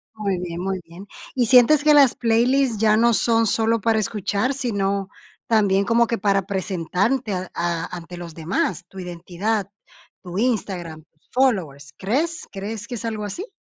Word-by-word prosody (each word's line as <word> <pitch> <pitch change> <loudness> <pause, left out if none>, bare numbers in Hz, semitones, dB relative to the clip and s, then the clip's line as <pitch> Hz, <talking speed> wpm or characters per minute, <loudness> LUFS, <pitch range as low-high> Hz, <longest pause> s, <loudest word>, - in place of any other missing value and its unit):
Muy 200 -4 -1
bien, 175 -1 -5
muy 190 0 -2
bien. 175 +4 -12 0.3
¿Y 245 -3 +2
sientes 255 +5 +6
que 300 0 +5
las 280 -4 +6
playlist 240 +1 +2
ya 215 -1 +4
no 235 0 +4
son 225 0 +2
solo 225 +1 +1
para 225 +1 +2
escuchar, 210 +3 -1
sino 200 -7 -1 0.4
también 200 -3 +3
como 235 +2 +3
que 230 - -2
para 195 -1 +2
presentante 195 +5 -1
a 185 -1 -4
a 170 -1 -1
ante 175 +1 -9
los 170 -2 -8
demás? 170 +1 -2
Tu 195 - -13
identidad, 185 +4 -3 0.5
tu 180 0 -6
Instagram, 185 -9 -2 0.3
followers. 165 - 0
¿Crees 300 - -1
crees 205 +2 -6
que 245 - -5
es 225 - -7
algo 220 -2 -3
así? 360 - -6
205 Hz, 165 wpm, -22 LUFS, 180-230 Hz, 0.5 s, sientes